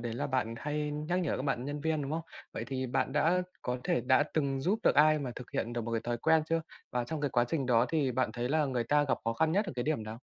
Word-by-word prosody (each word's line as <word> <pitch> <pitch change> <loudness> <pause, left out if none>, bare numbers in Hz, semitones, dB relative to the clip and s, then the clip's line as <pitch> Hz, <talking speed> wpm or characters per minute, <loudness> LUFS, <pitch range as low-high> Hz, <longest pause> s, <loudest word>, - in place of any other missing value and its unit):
đấy 115 -1 -3
là - - -2
bạn 130 -4 -1
hay 150 +1 -2
nhắc 155 +5 -1
nhở 170 - 0
các - - -3
bạn 135 -3 -1
nhân 145 +1 -4
viên, 160 -1 0
đúng 140 - -4
không? 165 - -1 0.3
Vậy - - -4
thì 130 -1 -2
bạn 135 +1 0
đã 165 +5 +3 0.2
có 125 0 -2
thể - - +1
đã 130 +4 +4
từng 140 -3 0
giúp 195 +9 +1
được - - +4
ai 155 +1 +6
mà 135 -4 -3
thực 125 - -8
hiện 115 - -2
được 120 - -2
một 115 - -4
cái 115 - +1
thói 120 +1 -2
quen 160 +4 +4
chưa? 165 0 +1 0.3
Và 125 -1 -1
trong 155 +5 -4
cái 145 -2 0
quá 120 -1 +3
trình 140 -3 -1
đó 120 -1 +4
thì 145 -5 +1
bạn 130 +1 0
thấy 120 0 -2
là 155 +2 +2
người 125 -3 -1
ta 145 +5 +3
gặp 140 - 0
khó 115 - +1
khăn 160 +7 +1
nhất 205 +4 +2
ở - - -4
cái 120 - 0
điểm 150 -3 0
nào? 110 +2 -7
135 Hz, 300 wpm, -31 LUFS, 120-155 Hz, 0.3 s, ai